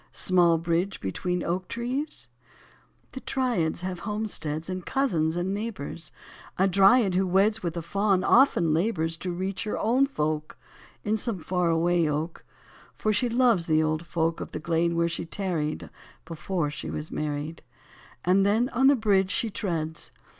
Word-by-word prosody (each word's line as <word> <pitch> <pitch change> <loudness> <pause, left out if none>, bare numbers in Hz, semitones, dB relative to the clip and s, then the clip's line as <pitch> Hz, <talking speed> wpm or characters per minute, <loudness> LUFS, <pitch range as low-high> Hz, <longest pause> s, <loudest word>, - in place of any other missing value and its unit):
Small 175 -3 +3
bridge 170 +4 -1
between 180 - -2
small 170 - -1
oak 185 0 -4
trees? 255 +6 -4 0.8
The 265 - -7
Dryads 235 -14 -1
have 185 -1 -4
homesteads, 195 -8 -3
And 185 -1 -4
cousins 170 - 0
and 180 +2 -1
neighbours: 200 -6 -5 0.5
A 190 - +4
Dryad, 195 +2 +5
who 190 +1 +1
weds 200 +4 +2
With 170 -1 -3
a 170 - -3
Faun, 195 +1 +1
often 210 - +4
labours 165 -2 0
To 180 +2 -4
reach 190 +4 -3
her 210 - -2
own 250 +5 +2
folk 155 - -2 0.5
In 215 +1 +1
some 220 -1 -2
far 180 0 0
away 165 0 +2
oak; 155 +3 -3 0.5
For 215 - 0
she 240 +4 +1
loves 235 -7 +3
the 155 -1 +3
old 155 +2 -1
folk 165 -1 -1
Of - - -7
the - - -3
glade 170 +1 0
where 170 0 +2
she 165 0 -2
tarried 165 -4 -3 0.3
Before 165 -1 -2
she 150 - -6
was 150 +1 -5
married; 150 +2 -4 0.6
And 185 +2 +4
then 220 +5 +2
on 265 +1 +3
the 280 - +6
bridge 200 -5 +2
she 220 +2 0
treads. 165 -6 -3
180 Hz, 165 wpm, -26 LUFS, 165-210 Hz, 0.8 s, the